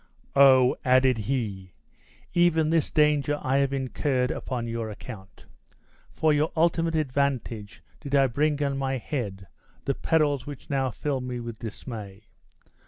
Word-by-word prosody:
"Oh!" 130 Hz, -2 st, +6 dB
added 130 Hz, -1 st, +4 dB
he, 100 Hz, -9 st, -3 dB, 0.6 s
"even 165 Hz, -3 st, +3 dB
this 165 Hz, -3 st, +2 dB
danger 150 Hz, -1 st, +2 dB
I 130 Hz, +1 st, 0 dB
have 140 Hz, -1 st, +2 dB
incurred 130 Hz, -1 st, -1 dB
upon 125 Hz, -3 st, -4 dB
your 115 Hz, -1 st, -3 dB
account! 105 Hz, -2 st, -10 dB, 0.7 s
For 155 Hz, -1 st, +2 dB
your 150 Hz, +2 st, +1 dB
ultimate 165 Hz, 0 st, +2 dB
advantage 130 Hz, -7 st, -2 dB, 0.2 s
did 140 Hz, 0 st, -3 dB
I 135 Hz, -1 st, +5 dB
bring 145 Hz, +3 st, 0 dB
on 140 Hz, -1 st, -1 dB
my 135 Hz, -1 st, -1 dB
head 105 Hz, -8 st, -4 dB, 0.4 s
the 140 Hz, -, +1 dB
perils 145 Hz, -3 st, +1 dB
which 145 Hz, -1 st, -8 dB
now 135 Hz, -2 st, +1 dB
fill 135 Hz, +2 st, -3 dB
me 125 Hz, -1 st, -4 dB
with 115 Hz, -2 st, -7 dB
dismay! 110 Hz, -3 st, -8 dB
135 Hz, 140 wpm, -26 LUFS, 120-145 Hz, 0.7 s, Oh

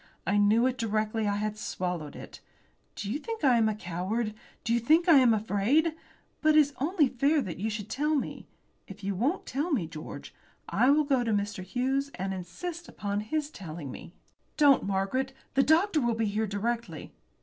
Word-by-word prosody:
I 200 Hz, -, +2 dB
knew 215 Hz, +4 st, +4 dB
it 255 Hz, -1 st, 0 dB
directly 215 Hz, -1 st, 0 dB
I 200 Hz, -, +1 dB
had 210 Hz, +1 st, -3 dB
swallowed 180 Hz, -7 st, -4 dB
it. -, -, -10 dB, 0.6 s
Do 200 Hz, 0 st, -4 dB
you 280 Hz, -, -1 dB
think 450 Hz, 0 st, -6 dB
I 260 Hz, -4 st, +5 dB
am 220 Hz, -1 st, +3 dB
a 215 Hz, -, -2 dB
coward? 205 Hz, +4 st, -3 dB, 0.3 s
Do 230 Hz, -, 0 dB
you 235 Hz, -, +3 dB
think 315 Hz, +9 st, +3 dB
I 330 Hz, -4 st, +8 dB
am 250 Hz, -3 st, +5 dB
afraid? 225 Hz, +9 st, +2 dB, 0.5 s
But 310 Hz, 0 st, +4 dB
it -, -, +8 dB
is 290 Hz, -1 st, +3 dB
only 305 Hz, +1 st, +2 dB
fair 280 Hz, +5 st, +2 dB
that 190 Hz, -10 st, -4 dB
you 215 Hz, +3 st, -1 dB
should 210 Hz, -2 st, -5 dB
tell 300 Hz, +6 st, 0 dB
me. 280 Hz, -, -3 dB, 0.4 s
If -, -, -11 dB
you 200 Hz, +1 st, -1 dB
won't 260 Hz, -, -1 dB
tell 290 Hz, +7 st, -2 dB
me, 225 Hz, -, +1 dB
George, 155 Hz, -1 st, -9 dB, 0.3 s
I 250 Hz, -, +3 dB
will 300 Hz, +2 st, +5 dB
go 270 Hz, -4 st, +1 dB
to 230 Hz, -, -1 dB
Mr. 205 Hz, -2 st, -1 dB
Hughes 260 Hz, +8 st, -1 dB
and 190 Hz, +1 st, -3 dB
insist 320 Hz, -, -6 dB
upon 205 Hz, 0 st, -3 dB
his 295 Hz, +8 st, -2 dB
telling 160 Hz, -, -7 dB
me." -, -, -10 dB, 0.5 s
"Don't, 285 Hz, -3 st, +6 dB
Margaret. 200 Hz, +8 st, -1 dB, 0.2 s
The 270 Hz, -, +4 dB
doctor 320 Hz, +3 st, +3 dB
will 240 Hz, -2 st, +1 dB
be 225 Hz, 0 st, 0 dB
here 215 Hz, +1 st, -1 dB
directly." 230 Hz, +4 st, -3 dB
230 Hz, 195 wpm, -28 LUFS, 205-285 Hz, 0.6 s, I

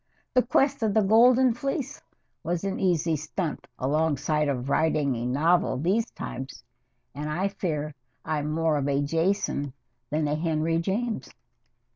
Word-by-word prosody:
The 255 Hz, -, +5 dB
Quest 270 Hz, +2 st, +2 dB
of 215 Hz, -3 st, +1 dB
the 220 Hz, -, +5 dB
Golden 240 Hz, +4 st, +5 dB
Fleece 275 Hz, +3 st, -3 dB, 0.4 s
was 170 Hz, +2 st, -2 dB
an 195 Hz, -1 st, -2 dB
easy 170 Hz, -3 st, +2 dB
stunt 155 Hz, +2 st, -4 dB
alongside 150 Hz, +1 st, +1 dB
of 130 Hz, -2 st, -2 dB
writing 150 Hz, -1 st, +2 dB
a 120 Hz, 0 st, -3 dB
novel 160 Hz, +4 st, +2 dB
these 195 Hz, -, +1 dB
times, 130 Hz, +1 st, -7 dB, 0.5 s
and 150 Hz, +3 st, -4 dB
I 185 Hz, +6 st, 0 dB
fear 155 Hz, -6 st, -3 dB, 0.3 s
I'm 150 Hz, -1 st, -1 dB
more 160 Hz, 0 st, +1 dB
of 140 Hz, -1 st, -1 dB
a 140 Hz, 0 st, +1 dB
Jason 160 Hz, -3 st, 0 dB, 0.4 s
than 150 Hz, +1 st, 0 dB
a 145 Hz, -, 0 dB
Henry 160 Hz, +1 st, 0 dB
James!" 215 Hz, +6 st, -2 dB
160 Hz, 145 wpm, -26 LUFS, 150-200 Hz, 0.5 s, The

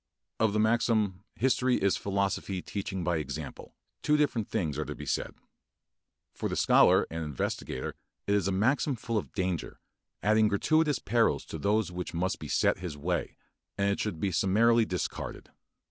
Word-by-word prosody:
Of 110 Hz, -2 st, +2 dB
the 105 Hz, -, +1 dB
maxim, 110 Hz, -3 st, +1 dB
"history 130 Hz, +1 st, +2 dB
is 100 Hz, -1 st, +2 dB
philosophy 100 Hz, -1 st, -1 dB
teaching 95 Hz, -2 st, -4 dB
by 85 Hz, -1 st, +1 dB
example," 75 Hz, -, -6 dB, 0.3 s
two 150 Hz, 0 st, +3 dB
different 125 Hz, -8 st, 0 dB
things 80 Hz, -10 st, -1 dB
are 75 Hz, -, -1 dB
to -, -, -5 dB
be -, -, -8 dB
said. -, -, -2 dB, 1.0 s
For -, -, -3 dB
the -, -, -2 dB
scholar -, -, +5 dB
and 80 Hz, 0 st, -3 dB
investigator 70 Hz, -3 st, -3 dB, 0.3 s
it 100 Hz, -, +1 dB
is 100 Hz, -3 st, +2 dB
a -, -, +1 dB
maxim 130 Hz, +8 st, +2 dB
full 115 Hz, -1 st, -1 dB
of -, -, -9 dB
danger, 90 Hz, -4 st, -2 dB, 0.4 s
adding 110 Hz, +1 st, +4 dB
gratuitous 150 Hz, +8 st, +2 dB
perils 115 Hz, +1 st, +1 dB
to 80 Hz, -, -7 dB
those 105 Hz, +3 st, +1 dB
which 90 Hz, -1 st, -5 dB
must 95 Hz, +3 st, -1 dB
beset -, -, +1 dB
his 90 Hz, -5 st, -5 dB
way, 85 Hz, +4 st, -2 dB, 0.4 s
and 100 Hz, 0 st, +2 dB
it 100 Hz, -, -2 dB
should 100 Hz, -7 st, -2 dB
be 100 Hz, +1 st, 0 dB
summarily 115 Hz, +6 st, +4 dB
discarded. 90 Hz, -3 st, -4 dB
100 Hz, 165 wpm, -29 LUFS, 90-115 Hz, 1.0 s, scholar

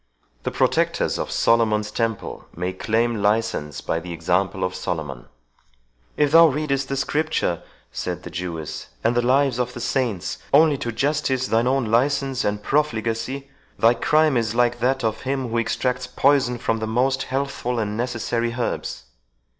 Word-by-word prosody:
The -, -, -2 dB
protectors -, -, +1 dB
of -, -, -3 dB
Solomon's 110 Hz, -2 st, +2 dB
Temple 115 Hz, -2 st, -3 dB
may 90 Hz, +2 st, -2 dB
claim 115 Hz, +3 st, 0 dB
license 105 Hz, -8 st, 0 dB
by 80 Hz, -, -1 dB
the 85 Hz, +1 st, -8 dB
example 95 Hz, +4 st, 0 dB
of 90 Hz, 0 st, -1 dB
Solomon." 75 Hz, -9 st, -4 dB, 0.9 s
"If 145 Hz, -1 st, +3 dB
thou 165 Hz, +1 st, +8 dB
readest 140 Hz, -2 st, -1 dB
the 135 Hz, -, -1 dB
Scripture," 145 Hz, -, 0 dB, 0.3 s
said -, -, -4 dB
the -, -, -8 dB
Jewess, 85 Hz, -4 st, -5 dB, 0.2 s
"and 120 Hz, -, +3 dB
the 120 Hz, -, +3 dB
lives 130 Hz, 0 st, +2 dB
of 125 Hz, 0 st, -1 dB
the -, -, -5 dB
saints, 115 Hz, -7 st, -1 dB
only 155 Hz, -2 st, +6 dB
to 120 Hz, -, -3 dB
justify 135 Hz, +1 st, 0 dB
thine 115 Hz, +2 st, +3 dB
own 135 Hz, -1 st, +2 dB
license 135 Hz, +3 st, +1 dB
and 105 Hz, 0 st, -1 dB
profligacy, 130 Hz, 0 st, -1 dB, 0.3 s
thy 115 Hz, +1 st, +5 dB
crime 155 Hz, +2 st, +3 dB
is 115 Hz, -1 st, -1 dB
like 120 Hz, 0 st, +2 dB
that 130 Hz, +2 st, +1 dB
of 110 Hz, -1 st, -1 dB
him 130 Hz, -2 st, -2 dB
who 115 Hz, +1 st, 0 dB
extracts 125 Hz, +2 st, -1 dB
poison 135 Hz, -3 st, +2 dB
from 115 Hz, -1 st, -1 dB
the 110 Hz, -, -3 dB
most 130 Hz, +4 st, +1 dB
healthful 135 Hz, -2 st, -2 dB
and 105 Hz, -2 st, -1 dB
necessary 115 Hz, 0 st, -1 dB
herbs." 115 Hz, -, -3 dB
120 Hz, 160 wpm, -23 LUFS, 110-135 Hz, 0.9 s, thou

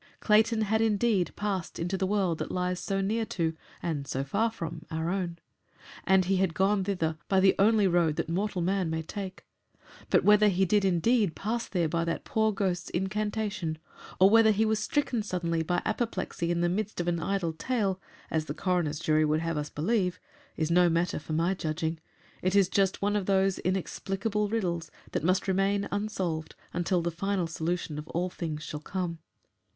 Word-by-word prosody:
Clayton 220 Hz, +1 st, +3 dB
had, 220 Hz, +1 st, +1 dB
indeed, 215 Hz, -3 st, +2 dB
passed 195 Hz, -4 st, -3 dB
into 175 Hz, +3 st, -2 dB
the 190 Hz, 0 st, 0 dB
world 190 Hz, -5 st, +1 dB
that -, -, -3 dB
lies 180 Hz, 0 st, -1 dB
so 195 Hz, +1 st, -1 dB
near 220 Hz, +4 st, 0 dB
to 165 Hz, -3 st, -1 dB, 0.3 s
and 145 Hz, -5 st, -2 dB
so 135 Hz, +1 st, -2 dB
far 200 Hz, +11 st, +1 dB
from 165 Hz, -7 st, -6 dB
our 160 Hz, +1 st, -2 dB
own, 180 Hz, -3 st, -2 dB, 0.7 s
and 190 Hz, -1 st, +4 dB
he 190 Hz, +1 st, +2 dB
had 185 Hz, -4 st, +1 dB
gone 195 Hz, +1 st, +2 dB
thither 165 Hz, -5 st, -1 dB
by 190 Hz, -, +3 dB
the 190 Hz, 0 st, +5 dB
only 210 Hz, +1 st, +5 dB
road 170 Hz, -4 st, +2 dB
that -, -, -2 dB
mortal 185 Hz, +1 st, -1 dB
man 185 Hz, -1 st, 0 dB
may 160 Hz, 0 st, -2 dB
take. 195 Hz, +3 st, -7 dB, 0.6 s
But -, -, +4 dB
whether 210 Hz, 0 st, +6 dB
he 190 Hz, -1 st, +3 dB
did 205 Hz, +2 st, +2 dB
indeed 195 Hz, +1 st, +2 dB
pass 230 Hz, +3 st, -2 dB
there 175 Hz, -4 st, 0 dB
by 165 Hz, +1 st, 0 dB
that 170 Hz, -, -2 dB
poor 220 Hz, 0 st, +2 dB
ghost's 185 Hz, -3 st, -1 dB
incantation, 200 Hz, -2 st, -2 dB, 0.4 s
or 190 Hz, +2 st, +7 dB
whether 225 Hz, 0 st, +7 dB
he 215 Hz, +1 st, +3 dB
was 220 Hz, 0 st, +1 dB
stricken 250 Hz, 0 st, 0 dB
suddenly 170 Hz, -5 st, -1 dB
by 175 Hz, +2 st, -1 dB
apoplexy 220 Hz, -6 st, -2 dB
in 170 Hz, 0 st, +1 dB
the 175 Hz, -, +3 dB
midst 210 Hz, +3 st, -2 dB
of 175 Hz, -, -2 dB
an 170 Hz, -1 st, +1 dB
idle 175 Hz, -1 st, -1 dB
tale 195 Hz, 0 st, -1 dB, 0.3 s
as 160 Hz, -1 st, 0 dB
the 145 Hz, -, -5 dB
coroner's 170 Hz, -4 st, 0 dB
jury 155 Hz, +1 st, +2 dB
would 155 Hz, +1 st, +1 dB
have 165 Hz, 0 st, -2 dB
us 150 Hz, 0 st, -3 dB
believe 185 Hz, +2 st, 0 dB, 0.4 s
is 160 Hz, +1 st, 0 dB
no 175 Hz, 0 st, +5 dB
matter 170 Hz, 0 st, 0 dB
for 155 Hz, +1 st, -6 dB
my 170 Hz, +4 st, +2 dB
judging; 160 Hz, -2 st, -2 dB, 0.4 s
it 185 Hz, +1 st, +1 dB
is 195 Hz, -2 st, +5 dB
just 195 Hz, 0 st, +1 dB
one 205 Hz, +1 st, +2 dB
of 200 Hz, -3 st, -1 dB
those 195 Hz, -1 st, +2 dB
inexplicable 195 Hz, +3 st, -1 dB
riddles 175 Hz, -7 st, -1 dB, 0.2 s
that -, -, -2 dB
must 185 Hz, +3 st, +2 dB
remain 195 Hz, +1 st, +1 dB
unsolved 190 Hz, -6 st, -2 dB, 0.2 s
until 175 Hz, 0 st, 0 dB
the 170 Hz, -, -1 dB
final 190 Hz, +2 st, -1 dB
solution 165 Hz, -1 st, -3 dB
of 150 Hz, -, -8 dB
all 180 Hz, +2 st, -2 dB
things 155 Hz, -4 st, -4 dB
shall 150 Hz, -, -5 dB
come. 170 Hz, +1 st, -4 dB
185 Hz, 190 wpm, -29 LUFS, 165-205 Hz, 0.7 s, or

